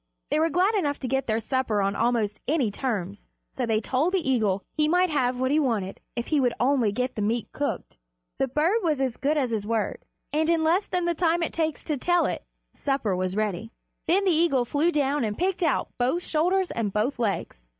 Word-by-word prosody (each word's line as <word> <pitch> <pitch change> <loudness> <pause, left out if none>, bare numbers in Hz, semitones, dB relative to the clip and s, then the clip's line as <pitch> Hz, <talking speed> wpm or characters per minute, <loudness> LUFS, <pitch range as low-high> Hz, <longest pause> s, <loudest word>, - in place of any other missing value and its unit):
They 300 - +2
were 325 +1 +3
glad 365 +7 +2
enough 295 -9 0
to 260 - -2
get 270 +1 -1
their 220 0 +1
supper 230 -2 0
on 200 0 0
almost 225 -3 0
any 270 -7 +1
terms, 205 -5 -3 0.2
so 250 -2 -3
they 220 -1 +2
told 270 - 0
the 315 -8 0
eagle 205 -6 +1
he 305 -1 +2
might 360 +2 +3
have 250 -4 +1
what 260 +1 +1
he 305 - +4
wanted 220 -9 -1 0.2
if 235 0 -2
he 305 - +3
would 245 -3 +1
only 250 -4 +2
get 250 +4 -2
the 215 - -4
meat 220 +2 -1
cooked. 290 - -4 0.4
The 270 - +2
bird 315 - +2
was 310 -7 0
as 260 -3 -1
good 295 +2 +1
as 260 -5 0
his 210 -2 -2
word, 225 -1 -1 0.3
and 315 +2 +1
in 330 -1 +3
less 345 +6 +2
time 360 -1 -1
than 345 0 +1
it - - -6
takes 320 -2 -1
to 300 - -2
tell 350 +6 +2
it - - -3 0.3
supper 270 -9 -1
was 185 +1 -2
ready. 215 0 -2 0.4
Then 390 +4 +3
the 375 - +4
eagle 315 -6 +2
flew 295 +7 +1
down 290 -3 +1
and 210 -2 -2
picked 370 +1 0
out 320 -6 +1
both 260 +9 +1
shoulders 360 +4 +1
and 220 -3 -2
both 225 +6 -1
legs. 205 - -2
270 Hz, 220 wpm, -26 LUFS, 225-320 Hz, 0.4 s, he